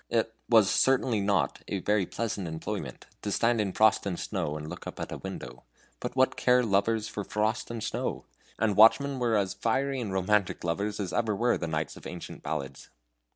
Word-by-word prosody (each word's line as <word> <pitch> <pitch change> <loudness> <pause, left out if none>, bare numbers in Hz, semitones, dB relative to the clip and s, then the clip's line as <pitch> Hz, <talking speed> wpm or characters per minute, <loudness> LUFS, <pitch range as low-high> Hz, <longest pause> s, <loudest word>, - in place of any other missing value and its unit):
It 115 -1 0 0.2
was 110 -4 +6
certainly 125 -2 +2
not 100 0 +1
a - - -2
very 105 -3 +1
pleasant 105 -5 -3
employment 80 0 -5 0.2
to 105 - -3
stand 115 +2 +2
in 100 -2 -1
frost 110 +2 +4
and 90 -3 -3
snow 85 -7 -2
and 75 0 -7
look - - -8
up - - -7
at - - -5
a - - -5
window; 60 0 -7 0.4
but - - -5
what 130 0 +3
care 125 0 +4
lovers 110 +1 +1
for 105 -2 -4
frost 105 +2 -1
and 115 -2 -5
snow? - - -3 0.3
And 105 -1 +1
watchmen 130 +5 +5
are 115 -2 +2
as 95 -3 +1
fiery 130 +6 0
and 105 -5 -4
romantic 95 +1 +1
lovers 100 +5 -2
as 95 -3 -3
ever 115 -3 +1
were 120 +4 +2
the 85 - -3
knights 80 -1 -3
of - - -9
ancient 90 - -8
ballads. 70 -3 -5
105 Hz, 200 wpm, -28 LUFS, 95-115 Hz, 0.4 s, was